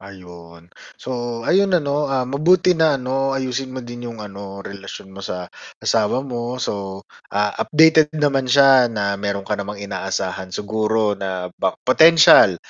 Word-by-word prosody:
Ayun. 85 Hz, -3 st, -14 dB, 0.2 s
So, 120 Hz, -2 st, -5 dB
ayun 195 Hz, +7 st, +3 dB
ano, 145 Hz, -2 st, -1 dB
ah, 130 Hz, -2 st, 0 dB
mabuti 170 Hz, +8 st, +2 dB
na 160 Hz, -4 st, +2 dB
ano, 135 Hz, +1 st, -2 dB
ayusin 130 Hz, 0 st, -3 dB
mo 130 Hz, -, -6 dB
din 120 Hz, 0 st, -8 dB
yung 115 Hz, -1 st, -9 dB
ano, 100 Hz, -1 st, -10 dB
relasyon 100 Hz, -1 st, -10 dB
mo 95 Hz, -, -10 dB
sa 90 Hz, -2 st, -5 dB, 0.3 s
asawa 115 Hz, +4 st, 0 dB
mo. 120 Hz, -1 st, -5 dB
So, 100 Hz, -4 st, -5 dB, 0.3 s
ah, 105 Hz, 0 st, 0 dB
updated 160 Hz, 0 st, +4 dB
naman 140 Hz, -3 st, 0 dB
siya 135 Hz, -2 st, +6 dB
na 100 Hz, -3 st, -2 dB
mayro'n 100 Hz, -1 st, -3 dB
ka 105 Hz, -, -1 dB
namang 100 Hz, 0 st, -6 dB
inaasahan 95 Hz, -1 st, -4 dB
siguro 110 Hz, +2 st, -1 dB
na 95 Hz, -2 st, -5 dB
ba 95 Hz, -, -2 dB
potensyal 145 Hz, -, +6 dB
115 Hz, 150 wpm, -20 LUFS, 100-135 Hz, 0.3 s, siya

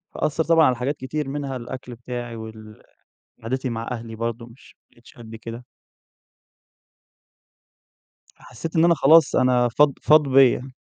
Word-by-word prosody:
أثّر 155 Hz, +2 st, -1 dB
طبعًا 165 Hz, -1 st, +4 dB
على 130 Hz, -, +2 dB
حاجات 130 Hz, +5 st, -3 dB
كتير 135 Hz, +2 st, -5 dB
منها 140 Hz, -1 st, -4 dB
الأكل 125 Hz, 0 st, -9 dB
بتاعي 120 Hz, 0 st, -7 dB
وال 110 Hz, -1 st, -11 dB, 0.6 s
قعدتي 130 Hz, +3 st, -3 dB
مع 115 Hz, 0 st, -5 dB
أهلي 115 Hz, -2 st, -7 dB
برضه 115 Hz, +1 st, -4 dB
مش 120 Hz, +2 st, -19 dB
ما -, -, -84 dB
بقيتش 120 Hz, 0 st, -20 dB
قد 115 Hz, -1 st, -10 dB
كده. 115 Hz, +2 st, -9 dB, 2.7 s
فحسّيت 155 Hz, +7 st, -9 dB
إن 165 Hz, +1 st, +4 dB
أنا 170 Hz, 0 st, +4 dB
خلاص 155 Hz, +1 st, +5 dB
أنا 125 Hz, -1 st, +3 dB
فاض 145 Hz, +4 st, +3 dB
فاض 150 Hz, -1 st, +4 dB
بيّا. 130 Hz, 0 st, +3 dB
125 Hz, 145 wpm, -22 LUFS, 115-140 Hz, 2.7 s, خلاص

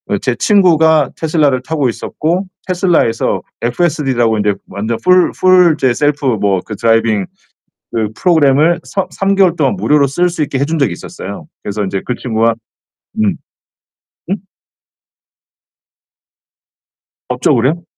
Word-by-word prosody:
어 -, -, +1 dB
제 -, -, -2 dB
친구가 160 Hz, -, +3 dB
테슬라를 150 Hz, -5 st, +1 dB
타고 150 Hz, -2 st, -1 dB
있었고 165 Hz, -, -2 dB, 0.2 s
테슬라에서 175 Hz, -, +1 dB, 0.2 s
FSD라고 125 Hz, -4 st, 0 dB
인제 105 Hz, -1 st, +1 dB
완전 110 Hz, +3 st, -3 dB
full 180 Hz, -1 st, +4 dB
full 185 Hz, -2 st, +5 dB
이제 130 Hz, -4 st, +1 dB
셀프 145 Hz, +2 st, 0 dB
뭐 100 Hz, -6 st, +1 dB
그 105 Hz, -, -6 dB
드라이빙 115 Hz, -2 st, +1 dB, 0.7 s
그 110 Hz, -2 st, -1 dB
프로그램을 160 Hz, -1 st, +3 dB
서 195 Hz, -, -3 dB
3 195 Hz, 0 st, 0 dB
개월 190 Hz, -3 st, +3 dB
동안 135 Hz, -9 st, +1 dB
무료로 140 Hz, +8 st, +2 dB
쓸 175 Hz, +7 st, 0 dB
수 170 Hz, -2 st, -4 dB
있게 140 Hz, -2 st, -3 dB
해 140 Hz, -, +1 dB
준 160 Hz, +2 st, -2 dB
적이 140 Hz, -9 st, +1 dB
있었어요. -, -, -9 dB, 0.2 s
그래서 105 Hz, +1 st, -3 dB
인제 95 Hz, 0 st, -3 dB
그 125 Hz, -, -2 dB
친구가 115 Hz, -1 st, 0 dB, 0.7 s
음. 105 Hz, -, 0 dB, 0.9 s
음? 195 Hz, -, +1 dB, 2.9 s
법적으로요? 130 Hz, +5 st, +1 dB
140 Hz, 295 characters per minute, -14 LUFS, 115-170 Hz, 2.9 s, full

